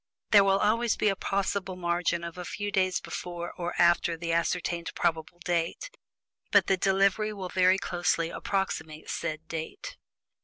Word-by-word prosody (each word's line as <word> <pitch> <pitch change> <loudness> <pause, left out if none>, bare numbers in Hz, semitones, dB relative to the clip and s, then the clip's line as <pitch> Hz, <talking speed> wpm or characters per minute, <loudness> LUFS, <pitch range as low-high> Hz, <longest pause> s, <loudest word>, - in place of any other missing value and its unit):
There 205 -2 +8
will 195 0 +3
always 225 +3 +2
be 210 - +2
a 195 - 0
possible 195 -1 -2
margin 170 -1 0
of 170 -1 -6
a 180 - -6
few 205 +3 -4
days 185 -2 +1
before 175 -1 -6
or 175 0 -4
after 170 -1 +3
the 165 0 -2
ascertained 170 0 -1
probable 165 0 -1
date 175 - -1 0.6
but - - +5
the 195 - +3
delivery 195 +3 +2
will 190 -3 -6
very 185 +1 +4
closely 175 -3 0
approximate 160 -6 -3
said 155 +1 -4
date. 165 - -6
180 Hz, 155 wpm, -28 LUFS, 170-195 Hz, 0.6 s, There